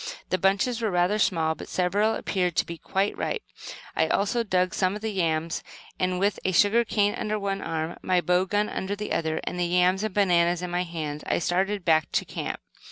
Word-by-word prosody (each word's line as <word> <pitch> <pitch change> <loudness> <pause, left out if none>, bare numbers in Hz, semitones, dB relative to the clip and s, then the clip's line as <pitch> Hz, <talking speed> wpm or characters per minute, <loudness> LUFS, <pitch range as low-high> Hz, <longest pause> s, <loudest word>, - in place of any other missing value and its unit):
The 185 - +1
bunches 200 +6 +1
were 220 - +1
rather 180 +3 +2
small, 160 -5 +2
but - - -10
several 205 +5 +1
appeared 180 -3 -1
to - - +2
be 170 -1 -7
quite 195 +2 -1
ripe. 450 - -3 0.5
I - - +2
also 205 +4 +1
dug 185 -4 +1
some 185 +1 +1
of 210 - -8
the 220 - -1
yams, 165 -3 -1 0.4
and 185 0 0
with 200 +2 +1
a 185 - +1
sugar 210 +6 +4
cane 205 -2 +1
under 215 0 -2
one 195 -1 -2
arm, 160 +1 -3
my 185 -1 +2
bow 180 +1 +2
gun 205 +2 0
under 195 0 -3
the 210 +1 -5
other, 160 -1 0
the 180 0 -2
yams 180 +2 +2
and 215 - -1
bananas 175 -3 +2
in 180 - -4
my 175 0 0
hands, 155 -3 -5
I - - +1
started 190 +3 0
back 160 -2 +3
to - - +3
the - - -14
camp. - - -3
185 Hz, 215 wpm, -26 LUFS, 175-205 Hz, 0.5 s, sugar